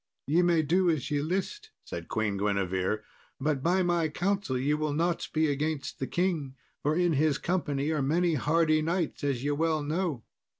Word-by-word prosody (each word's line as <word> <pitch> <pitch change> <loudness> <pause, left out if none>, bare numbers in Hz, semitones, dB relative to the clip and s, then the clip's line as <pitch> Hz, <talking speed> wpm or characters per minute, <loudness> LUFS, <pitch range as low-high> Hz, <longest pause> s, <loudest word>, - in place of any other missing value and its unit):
"Ye 160 +5 +3
may 170 -2 +3
do 175 +4 +3
as 155 -5 -1
ye 145 -1 +1
list," 195 - -3
said - - -7
Queen 110 -3 -1
Guinevere; 100 0 0 0.4
"but 140 0 0
by 180 +5 +2
my 170 -2 +1
counsel 190 -4 -1
ye 140 +4 +1
will 150 -1 -1
not 170 +3 0
be 155 0 +2
against 145 -1 -2
the 130 - -2
king, 165 -7 -1 0.3
for 150 +2 +1
in 175 -1 +2
his 150 0 +2
company 155 -5 -1
are 155 -2 0
many 165 +5 +2
hardy 155 +2 +2
knights, 170 0 -1
as 135 -3 -1
ye 145 - 0
well 155 +1 +1
know." 155 - -2
155 Hz, 180 wpm, -29 LUFS, 140-170 Hz, 0.4 s, Ye